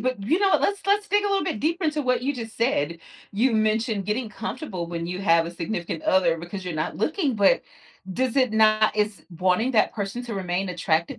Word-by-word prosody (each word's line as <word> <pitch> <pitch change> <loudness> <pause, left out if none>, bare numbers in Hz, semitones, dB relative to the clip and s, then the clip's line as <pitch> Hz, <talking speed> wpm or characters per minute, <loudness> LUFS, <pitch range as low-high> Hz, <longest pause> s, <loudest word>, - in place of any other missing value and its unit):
but, 250 -3 -2
you 310 - +2
know, 395 -1 +4
let's 400 0 0
let's 410 +1 +2
dig 410 +1 +2
a - - +2
little 395 -1 +1
bit - - -2
deeper 335 - -1
into 305 -1 0
what 250 -1 +1
you 280 +2 0
just 225 -3 -7
said. 170 - 0 0.3
You 230 +5 +2
mentioned 215 -1 +1
getting 220 +3 -2
comfortable 210 - -5
when 170 0 -4
you 180 +1 -4
have 165 -2 +4
a - - -5
significant 175 -2 -4
other 175 -3 +3
because 175 +3 -7
you're 180 -3 -4
not 155 +1 -3
looking, 295 - 0
but 200 -2 +4 0.5
does 260 +4 -1
it 255 -4 +3
not 215 0 +4
is 210 -1 -1
wanting 185 +7 +2
that 215 - +2
person 205 +3 -4
to 230 - -5
remain 185 0 -2
attracted 170 -1 -1
215 Hz, 215 wpm, -24 LUFS, 180-255 Hz, 0.5 s, know